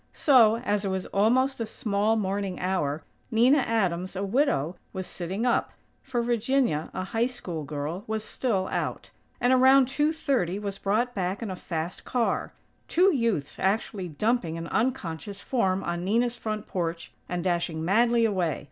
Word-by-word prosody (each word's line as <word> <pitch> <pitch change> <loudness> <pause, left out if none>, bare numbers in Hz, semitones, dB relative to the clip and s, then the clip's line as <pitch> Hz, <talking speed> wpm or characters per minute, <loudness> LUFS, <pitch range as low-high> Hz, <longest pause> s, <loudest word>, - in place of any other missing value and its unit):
So, 235 -7 +5
as 210 -4 -1
it - - -1
was 190 -1 -2
almost 250 +7 +2
"a 230 - -1
small 210 0 0
morning 195 -2 -2
hour," 160 -5 -1 0.3
Nina 250 +5 +5
Adams, 190 -7 0
a 195 - -2
widow, 190 - +1 0.2
was 190 -1 -4
sitting 190 +7 -3
up; 245 - +1 0.3
for 245 -3 -2
Virginia, 235 - +1
a 185 - -3
High 225 +5 0
School 175 -11 -6
girl, 150 +6 -4
was 220 0 -2
still 205 -6 -1
out; - - -3 0.3
and, 245 +1 +3
around 260 +1 +6
two 295 +4 +1
thirty, 260 - 0
was 200 -1 -5
brought 230 +5 0
back 190 +2 -2
in 210 - -4
a - - -4
fast 170 -1 -4
car; 245 -2 -1 0.4
two 370 +2 +4
youths 230 - -1
actually 195 -1 0
dumping 175 0 0
an 165 - -5
unconscious 200 -5 -2
form 195 -7 0
on 170 0 -3
Nina's 235 +5 +1
front 215 -2 -4
porch, 170 -2 -3 0.2
and 175 -1 -2
dashing 170 -3 -1
madly 230 +5 +3
away. 185 -8 0
205 Hz, 165 wpm, -27 LUFS, 180-240 Hz, 0.4 s, around